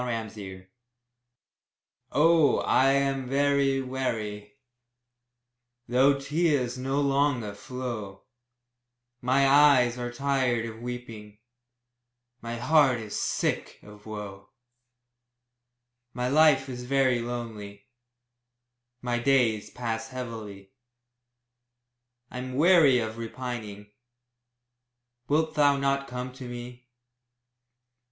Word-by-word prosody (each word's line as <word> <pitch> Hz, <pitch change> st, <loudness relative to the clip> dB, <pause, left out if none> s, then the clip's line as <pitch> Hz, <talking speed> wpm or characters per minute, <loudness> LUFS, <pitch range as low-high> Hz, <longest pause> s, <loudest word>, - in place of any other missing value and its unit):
APPEAL. 105 Hz, -5 st, -6 dB, 1.5 s
Oh, 160 Hz, 0 st, +4 dB
I 135 Hz, +1 st, +3 dB
am 135 Hz, -1 st, 0 dB
very 140 Hz, -1 st, +2 dB
weary, 110 Hz, -5 st, -4 dB, 1.3 s
Though 135 Hz, +3 st, +3 dB
tears 145 Hz, -3 st, 0 dB
no 135 Hz, +2 st, -2 dB
longer 140 Hz, -6 st, +1 dB
flow; 110 Hz, -4 st, -7 dB, 1.0 s
My 135 Hz, +2 st, +3 dB
eyes 135 Hz, -4 st, +5 dB
are 120 Hz, 0 st, -4 dB
tired 125 Hz, -2 st, 0 dB
of 115 Hz, 0 st, -8 dB
weeping, 115 Hz, -4 st, -8 dB, 1.0 s
My 115 Hz, 0 st, -5 dB
heart 135 Hz, -1 st, +3 dB
is 110 Hz, -2 st, -7 dB
sick -, -, -2 dB
of 105 Hz, 0 st, -15 dB
woe; 100 Hz, -2 st, -8 dB, 1.7 s
My 125 Hz, 0 st, -1 dB
life 145 Hz, -2 st, +4 dB
is 125 Hz, -1 st, -7 dB
very 130 Hz, -2 st, +2 dB
lonely 110 Hz, -4 st, -7 dB, 1.2 s
My 120 Hz, -1 st, -1 dB
days 120 Hz, -4 st, +2 dB
pass 115 Hz, -2 st, -4 dB
heavily, 110 Hz, -6 st, -8 dB, 1.6 s
I'm 125 Hz, 0 st, -6 dB
weary 155 Hz, -3 st, +5 dB
of 110 Hz, -1 st, -3 dB
repining; 115 Hz, -4 st, -7 dB, 1.4 s
Wilt 155 Hz, +2 st, +1 dB
thou 145 Hz, -2 st, +3 dB
not 140 Hz, 0 st, 0 dB
come 125 Hz, +1 st, -6 dB
to 130 Hz, -1 st, -9 dB
me? 120 Hz, +1 st, -9 dB
125 Hz, 90 wpm, -27 LUFS, 115-135 Hz, 1.7 s, eyes